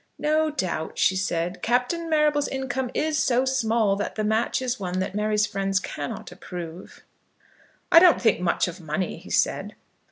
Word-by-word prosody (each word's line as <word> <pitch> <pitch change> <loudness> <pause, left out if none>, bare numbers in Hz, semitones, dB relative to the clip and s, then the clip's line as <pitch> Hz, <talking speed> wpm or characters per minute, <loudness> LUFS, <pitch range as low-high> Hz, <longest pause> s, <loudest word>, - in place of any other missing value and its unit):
"No 310 +1 +1
doubt," 185 - -3
she 190 - +3
said, 180 -1 -2
"Captain 250 +8 0
Marrable's 300 -2 +2
income 265 -1 -3
is 310 0 0
so 255 +1 +2
small 225 -5 +1
that 205 - -3
the 215 - -1
match 220 +2 +1
is 255 -2 -2
one 180 -2 -3
that 185 0 -2
Mary's 210 0 +1
friends 195 -1 -1
cannot 145 -5 -6
approve." 175 -1 -9 0.9
"I 330 - +10
don't 350 -1 +6
think 225 -3 +2
much 175 0 +1
of 175 0 -7
money," 165 +3 -3
he - - -13
said. - - 0
220 Hz, 165 wpm, -25 LUFS, 185-265 Hz, 0.9 s, I